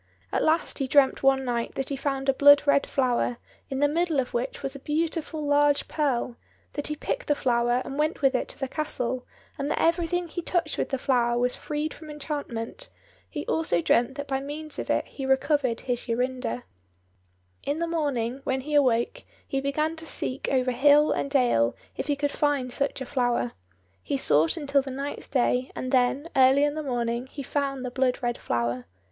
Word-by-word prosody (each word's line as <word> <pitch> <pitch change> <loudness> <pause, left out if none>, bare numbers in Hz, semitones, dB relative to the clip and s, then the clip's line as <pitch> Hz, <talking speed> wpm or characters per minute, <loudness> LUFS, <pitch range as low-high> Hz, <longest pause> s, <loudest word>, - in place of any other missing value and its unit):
At - - +1
last 320 +1 +1
he 270 - 0
dreamt 275 0 +4
one 270 -1 +3
night 235 -2 -2
that 270 - -2
he 280 - -1
found 275 0 -2
a 270 - +5
blood 285 +1 +7
red 285 -1 +3
flower, 245 -2 +1 0.3
in 270 - -3
the 290 - +5
middle 325 0 +1
of 250 - -2
which 240 +3 -3
was 270 +1 -3
a - - -7
beautiful 310 +1 -2
large 290 0 +3
pearl; 255 -5 -1 0.4
that 290 - -3
he 300 - -3
picked - - -3
the 295 - +3
flower 240 -1 +1
and 275 - -5
went 310 0 0
with 270 0 +5
it 255 - 0
to - - -7
the 270 - -1
castle, 255 -4 -3 0.3
and 280 +1 -1
that - - 0
everything 345 +1 +1
he 345 +2 -5
touched 335 -2 -1
with - - -1
the 270 - 0
flower 240 -2 +1
was 250 +1 +1
freed 300 +1 -3
from 310 - -12
enchantment; 295 - -5 0.4
he 295 -3 -5
also 320 - +1
dreamt 240 +9 +2
that 285 0 -5
by 270 -1 0
means 295 +2 -7
of - - -5
it - - +1
he 275 - -8
recovered 265 -2 +1
his 245 -1 -3
Jorinda. 245 - -2 1.0
In 285 - -1
the 335 - 0
morning, 275 -7 -1
when 265 0 -1
he 300 +3 -6
awoke, 265 - +2 0.2
he 270 - -1
began 305 +4 0
to 320 0 -7
seek 260 -3 -1
over 255 -1 +2
hill 290 +4 +5
and 280 - -1
dale 245 - +3 0.2
if - - -4
he 290 - +1
could 285 0 -1
find 280 -4 0
such 280 -1 -1
a - - -3
flower. 245 - 0 0.5
He 115 +9 -2
sought 155 +3 +3
until 280 -2 +2
the 270 - -7
ninth 275 +2 -5
day, 250 0 +1
and 255 - -4
then, 260 +3 +2
early 265 +2 +6
in 290 0 +2
the 310 - -3
morning, 240 -2 -2
he 280 +1 -7
found 275 -1 -2
the 250 - -4
blood 255 -1 +1
red 240 0 -1
flower. 120 +1 -1
275 Hz, 200 wpm, -26 LUFS, 250-295 Hz, 1.0 s, blood